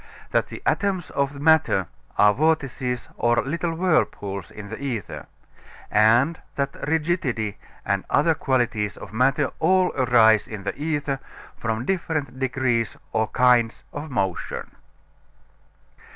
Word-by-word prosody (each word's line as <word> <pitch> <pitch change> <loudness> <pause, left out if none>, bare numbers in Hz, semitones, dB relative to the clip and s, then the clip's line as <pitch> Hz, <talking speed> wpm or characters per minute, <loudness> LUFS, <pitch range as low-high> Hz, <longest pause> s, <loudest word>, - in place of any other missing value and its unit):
That - - +2
the - - -9
atoms 195 -3 0
of 140 0 -1
matter 155 - +3 0.3
are 105 0 +6
vortices 130 -3 0
or 120 0 +2
little 165 +4 -2
whirlpools 105 - 0
in 105 -1 -10
the 110 - -6
ether; 120 -9 -4 0.6
and 120 +10 +4
that 140 0 -2
rigidity 150 - -1 0.3
and 100 -1 0
other 160 +3 +3
qualities 120 -8 0
of - - -10
matter 135 +4 +2
all 185 -1 +3
arise 115 -4 +4
in 105 -3 -7
the - - -3
ether 145 -2 -2 0.4
from 115 +1 -3
different 160 -7 -2
degrees 130 -3 0
or 110 0 +1
kinds 125 -2 +3
of 145 +2 -6
motion. 95 -8 -3
130 Hz, 125 wpm, -24 LUFS, 110-155 Hz, 0.6 s, are